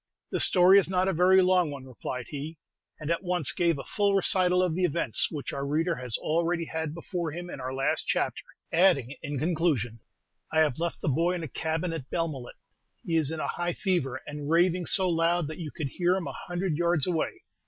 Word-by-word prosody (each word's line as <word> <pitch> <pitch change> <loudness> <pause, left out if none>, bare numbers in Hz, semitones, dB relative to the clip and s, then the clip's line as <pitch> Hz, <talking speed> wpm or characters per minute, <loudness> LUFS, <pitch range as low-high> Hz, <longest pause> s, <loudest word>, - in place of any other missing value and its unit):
"The - - -1
story 185 +2 +6
is 190 - -1
not 185 0 +1
a 190 - +1
very 185 +3 +5
long 180 -3 +3
one," 140 -2 -8
replied 125 -1 -6
he; 150 +2 -6 0.4
and 155 +1 -3
at 170 - 0
once 180 -6 +2
gave 170 -3 +1
a 135 - -6
full 205 -1 +1
recital 185 -1 +4
of 180 -3 0
the 185 +3 -1
events, 170 -1 +2
which 150 -4 -5
our 140 - -3
reader 160 +5 0
has 125 -5 0
already 170 +1 0
had 160 -1 -4
before 170 -1 -4
him 175 +3 -7
in - - -7
our 130 +1 -4
last 135 +1 -1
chapter, - - 0 0.3
adding, 160 -7 +3
in 145 -1 -4
conclusion, 150 -7 0 0.5
"I 160 0 +3
have 150 -3 +1
left 170 0 -3
the - - -3
boy 165 +6 +2
in 175 -2 -4
a - - -4
cabin 160 +5 -2
at 140 -5 -6
Belmullet; 155 -7 -3 0.5
he 165 - -2
is 155 -4 +2
in 160 0 -4
a - - -2
high 175 0 -2
fever, 155 -11 -1
and 150 0 -6
raving 175 +1 +2
so 190 -1 +3
loud 170 0 +1
that 155 - -7
you 160 -3 -5
could 145 -1 -5
hear 180 +5 +1
him 190 -3 -3
a - - -4
hundred 175 -3 -3
yards 170 -4 +2
away. 180 - -2
165 Hz, 215 wpm, -27 LUFS, 150-180 Hz, 0.5 s, story